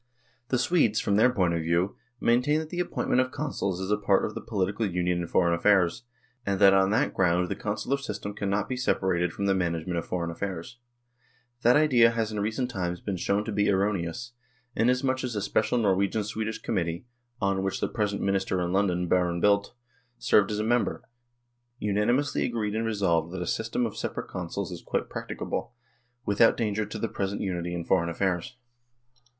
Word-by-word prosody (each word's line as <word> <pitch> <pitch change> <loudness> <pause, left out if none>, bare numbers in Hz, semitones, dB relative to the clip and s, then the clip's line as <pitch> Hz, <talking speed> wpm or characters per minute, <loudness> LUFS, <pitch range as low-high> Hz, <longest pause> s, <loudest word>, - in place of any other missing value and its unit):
The 130 - +1
Swedes, 120 -4 +2
from 100 - +1
their 115 +5 +5
point 90 -8 +1
of 85 - 0
view, 85 +4 0 0.2
maintain 125 +6 +3
that 155 0 -6
the 175 - -3
appointment 175 -7 +1
of 130 - -1
Consuls 130 -11 -3
is 95 +2 -3
a 105 - +3
part 100 -2 +2
of 110 - -4
the - - -6
political 100 +1 -1
union 90 -1 0
in 85 - -4
foreign 85 0 +2
affairs, 90 +3 +2 0.4
and 100 -3 -1
that 100 -1 +7
on 95 0 +4
that 105 - +1
ground 90 -1 +2
the - - -2
Consular 110 +6 -2
system 105 -5 -5
cannot 100 0 -1
be 130 - -2
separated 95 -8 +1
from 100 - -3
the 100 - +3
management 85 -1 -1
of 85 - -6
foreign 85 -2 -2
affairs. 95 +5 -5 0.8
That 120 +1 +5
idea 130 -6 +5
has 115 -2 -1
in 105 - -3
recent 110 +5 -1
times 90 -4 -3
been 100 +1 -3
shown 100 +4 0
to 110 - -3
be 105 0 +1
erroneous, 100 +3 -1 0.4
inasmuch 130 +2 +1
as 125 -3 -3
a - - 0
special 110 +3 +1
Norwegian 100 0 +1
Swedish 110 +2 -3
committee, 85 +2 -2 0.3
on 100 -2 +1
which 95 0 -2
the - - 0
present 105 -2 -2
Minister 95 -1 0
in 90 0 -1
London, 90 -3 +1
Baron 90 -1 +1
Bildt, 100 +3 +2 0.4
served 100 -2 +3
as 105 - -2
a 105 - 0
member, 120 +2 0 0.7
unanimously 105 +8 +1
agreed 110 -4 -1
and 115 +1 -1
resolved 85 -6 +1
that 95 - -4
a - - -5
system 115 +2 -1
of 110 - -4
separate - - -4
Consuls - - -4
is - - -7
quite - - -2
practicable, 120 - -4 0.5
without 105 +3 +4
danger 105 -2 -1
to 105 - -6
the 115 - -1
present 100 -1 -3
unity 90 -3 -2
in 85 -1 -4
foreign 85 -3 +2
affairs. 95 +7 -2
100 Hz, 190 wpm, -27 LUFS, 90-115 Hz, 0.8 s, that